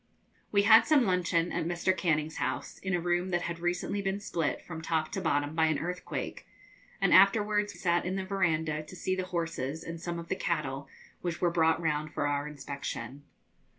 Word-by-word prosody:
We 200 -1 +4
had 220 +2 +7
some 295 -6 +5
luncheon 175 -2 +1
at 170 - -1
Mr. 175 +2 +1
Canning's 160 -3 0
house, 130 -1 -3
in 190 -1 -1
a - - 0
room 175 +1 0
that 175 -1 0
had 170 0 -4
recently 180 +3 -1
been 195 0 -1
split 165 -6 -1
from 160 -2 -7
top 160 -1 -1
to - - -3
bottom 145 +1 0
by 160 0 +3
an 155 -2 +1
earthquake, 180 +4 -5 0.5
and - - +3
afterwards 205 0 +4
sat 175 -1 +2
in 185 +1 -2
the 190 -1 -2
verandah 160 -5 0
to 155 +4 -11
see 185 +1 -1
the 185 -1 -2
horses 165 -4 -3
and 165 0 -7
some 175 0 -3
of 170 0 -7
the - - -1
cattle, 140 -6 -2 0.3
which 175 -1 -3
were 175 - +2
brought 160 -1 +3
round 155 -2 -1
for 145 - -1
our 145 0 0
inspection. 140 -1 -6
170 Hz, 195 wpm, -30 LUFS, 155-185 Hz, 0.5 s, had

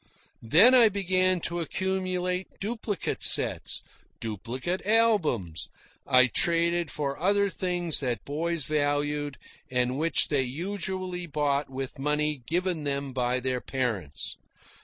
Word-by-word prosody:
Then 180 - +6
I 240 -4 +7
began 185 -2 +1
to 170 +1 -3
accumulate 185 +1 -2
duplicate 215 -2 -3
sets, - - +4 0.4
duplicate 120 - -4
albums. 185 - +1 0.4
I 130 -1 +6
traded 170 +5 +1
for 140 -1 -3
other 200 +2 +2
things 175 -4 0
that 125 -4 -3
boys 165 +2 -2
valued 145 -1 -1 0.3
and 125 +1 0
which 165 +2 +2
they 145 -3 +2
usually 180 +5 -4
bought 145 -2 -1
with 135 +1 -6
money 150 0 0
given 175 -1 -1
them 140 -1 -3
by 125 0 0
their 125 0 -2
parents. 110 - -3
155 Hz, 115 wpm, -27 LUFS, 135-185 Hz, 0.4 s, I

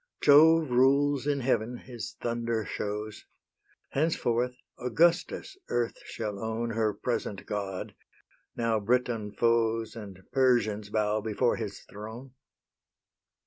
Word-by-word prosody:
Jove 155 0 +6
rules 140 +2 +3
in 140 -2 +1
heaven, 120 -1 0
his 120 -4 -8
thunder 115 -2 -1
shows; 105 +2 -4 0.7
Henceforth 125 -5 0 0.2
Augustus 170 - +1
earth 120 -1 -1
shall 105 -3 -4
own 115 +1 -2
Her 110 -1 +1
present 105 -2 -3
god, 100 -2 -4 0.6
now 115 -2 +1
Briton 115 -1 0
foes 115 0 +1
And 100 -4 -9
Persians 115 -6 +2
bow 105 0 +1
before 110 +3 +1
his 105 -3 -5
throne. 110 +6 -10
115 Hz, 105 wpm, -29 LUFS, 105-125 Hz, 0.7 s, Jove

